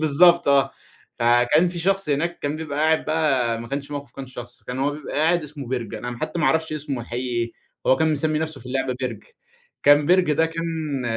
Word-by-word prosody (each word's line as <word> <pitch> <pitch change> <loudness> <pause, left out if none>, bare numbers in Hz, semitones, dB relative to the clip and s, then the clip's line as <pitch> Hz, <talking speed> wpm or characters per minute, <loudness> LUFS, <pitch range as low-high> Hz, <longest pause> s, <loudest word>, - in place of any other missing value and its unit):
بالضبط 170 +2 +5
آه، 140 -1 +4 0.5
فكان 120 +8 +4
في 175 0 -6
شخص 195 +1 0
هناك 170 +5 0
كان 145 +1 -2
بيبقى 150 -2 -5
قاعد 160 +1 +2
بقى 135 -8 +1
ما 115 - -8
كانش 140 +1 -4
موقف 145 -1 -6
كان 135 -1 -8
شخص، 120 -1 -10
كان 125 +1 -6
هو 140 +2 +1
بيبقى 150 +1 -7
قاعد 165 +2 +3
اسمه 150 -2 -8
بِرج، 120 -4 -3
أنا 120 -1 -5
حتى 170 - -3
ما 150 - +1
اعرفش 160 0 +1
اسمه 145 -4 -3
الحقيقي 120 +2 -4
إيه، 120 -1 -1 0.3
هو 130 - +5
كان 160 -1 +2
مِسمّي 155 +1 0
نَفسه 160 -3 -4
في - - -11
اللعبة 130 0 -1
بِرج، 130 - -4 0.6
كان 145 0 +6
بِرج 180 -3 +4
ده 160 +2 +3
كان 160 -4 -3
145 Hz, 210 wpm, -23 LUFS, 130-160 Hz, 0.6 s, كان